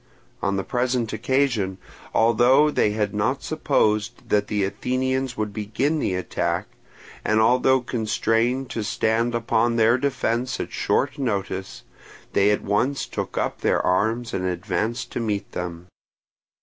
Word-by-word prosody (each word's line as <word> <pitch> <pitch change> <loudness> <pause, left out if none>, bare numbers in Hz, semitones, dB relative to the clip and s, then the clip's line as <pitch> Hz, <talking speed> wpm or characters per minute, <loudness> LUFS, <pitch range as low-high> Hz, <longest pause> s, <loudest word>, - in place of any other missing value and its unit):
On 100 - 0
the 95 - -1
present 120 -1 -1
occasion, 115 -5 0 0.3
although 120 +6 +4
they 105 - +2
had 105 -1 -1
not 110 +7 0
supposed 110 -9 0
that 105 - +2
the 105 -2 0
Athenians 130 +5 -1
would 105 -1 -2
begin 115 +9 -1
the 95 - 0
attack, 90 - -1 0.6
and 110 0 +2
although 125 +3 +4
constrained 120 +2 0
to 110 - -2
stand 115 +3 0
upon 115 0 +1
their 115 +2 +4
defence 125 -3 -1
at - - -4
short 145 - 0
notice, 100 -6 -3 0.5
they 100 +1 +4
at 105 - +1
once 120 +8 0
took - - -5
up - - -2
their - - +2
arms 110 +6 +1
and 95 - -1
advanced 110 +7 -2
to - - -3
meet 105 -3 -2
them. 85 -1 -5
115 Hz, 140 wpm, -23 LUFS, 105-125 Hz, 0.6 s, although